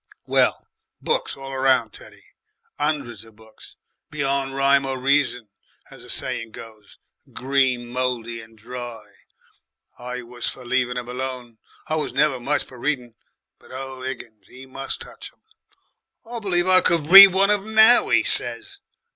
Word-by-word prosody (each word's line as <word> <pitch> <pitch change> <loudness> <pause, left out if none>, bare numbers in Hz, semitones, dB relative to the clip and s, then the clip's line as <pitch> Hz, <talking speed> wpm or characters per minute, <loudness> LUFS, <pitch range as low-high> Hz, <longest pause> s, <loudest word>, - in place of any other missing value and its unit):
"Well, - - +1 0.3
books 475 +1 -2
all 135 0 -8
round, 130 -4 +1
Teddy, - - -15 0.5
'undreds 140 -8 -2
of 110 -1 -18
books, 110 0 -15 0.3
beyond 140 -2 -2
rhyme 140 0 +3
or 135 -1 -3
reason, 130 -4 0 0.4
as - - -13
the - - -13
saying 115 -1 -3
goes, 110 -2 -13 0.4
green 130 -2 0
mouldy 120 -2 -3
and 110 0 -17
dry. 120 0 -9 0.9
I 125 0 -6
was 120 0 -4
for 125 - -9
leaven' 125 0 0
'em 125 -1 -5
alone 125 -2 -6 0.3
I 155 - -1
was 155 - -3
never 150 -4 +2
much 145 +4 -1
for 125 - -15
reading 125 -3 -2 0.5
but - - -19
ole 130 0 -8
Higgins 120 -5 -8
he 130 +1 -13
must 135 +1 -6
touch - - -11
em. - - -39 0.8
'I 235 +1 -7
believe 180 -4 +1
I 185 0 +6
could 165 -3 +2
read 195 +1 +13
one 195 +2 +2
of 210 - +2
'em 220 +2 -9
NOW,' 220 +2 +6
'e - - +4
says. 400 0 -4
130 Hz, 155 wpm, -22 LUFS, 120-145 Hz, 0.9 s, read